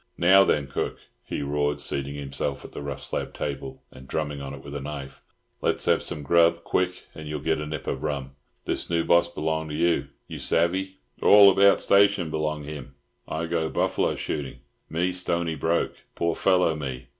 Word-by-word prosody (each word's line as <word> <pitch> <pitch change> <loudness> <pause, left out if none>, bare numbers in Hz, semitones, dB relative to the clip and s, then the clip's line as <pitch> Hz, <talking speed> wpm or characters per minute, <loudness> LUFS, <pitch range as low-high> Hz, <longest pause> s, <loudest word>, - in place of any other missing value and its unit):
Now 95 +3 +7
then, 75 -6 +1
cook," 70 - -3 0.3
he - - -4
roared, 75 +1 0
seating 70 0 -3
himself 70 -2 -4
at - - -10
the - - -7
rough 70 -1 -6
slab - - -4
table, 70 -2 -5
and 65 +1 -13
drumming 75 -2 -3
on 70 -1 -6
it 65 - -12
with 70 - -9
a 70 - -3
knife, 70 -1 -7 0.4
"let's - - 0
have - - +3
some 75 - -5
grub, 85 +2 +4
quick, 90 0 -1
and 80 -1 -9
you'll 75 0 -3
get 80 +1 0
a 75 - -4
nip 75 -1 -5
of - - -3
rum. 70 -2 -3 0.3
This - - -2
new 85 -1 +1
boss 85 0 +4
b'long 80 -1 -2
you, 85 +3 +1 0.2
you - - -7
savvy. 95 +3 0 0.2
All 100 -1 +8
about 100 +1 +5
station 100 -4 +4
b'long 75 -1 -2
him. 70 -2 -8 0.3
I 80 +1 -2
go 80 -1 -1
buffalo - - 0
shooting. 70 -4 -4 0.3
Me 85 +3 0
stony 85 -2 -1
broke. 80 +3 0 0.2
Poor 85 0 0
fellow 90 -4 +3
me! 65 -4 -6
80 Hz, 185 wpm, -26 LUFS, 70-85 Hz, 0.4 s, All